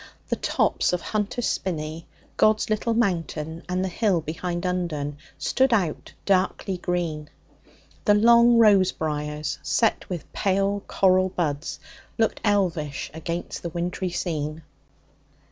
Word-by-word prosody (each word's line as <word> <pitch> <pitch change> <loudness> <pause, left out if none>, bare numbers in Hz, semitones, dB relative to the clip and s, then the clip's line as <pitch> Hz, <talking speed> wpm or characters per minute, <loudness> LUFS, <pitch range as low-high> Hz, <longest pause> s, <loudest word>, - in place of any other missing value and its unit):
The - - +1
tops - - +1
of 180 - 0
Hunter's 215 +4 -2
Spinney, 160 -3 -3 0.3
God's 215 0 +3
Little 225 +2 0
Mountain, 165 -6 -1
and 185 +1 0
the - - 0
hill 190 0 +1
behind 170 +3 -4
Undern 155 -6 -2 0.2
stood 265 0 +2
out 185 -9 0
darkly 190 -1 +1
green. 170 -5 -2 0.8
The 205 - +5
long 235 +2 +6
rose 205 -5 +6
briars, 150 -1 -3
set 225 - +1
with 175 -5 -6
pale 195 +1 +1
coral 185 -1 +3
buds, 155 -4 -2 0.4
looked 225 -1 +1
elvish 175 -9 0
against 170 +2 -5
the 170 - -4
wintry 175 +2 -2
scene. 155 -3 -3
180 Hz, 125 wpm, -25 LUFS, 160-200 Hz, 0.8 s, long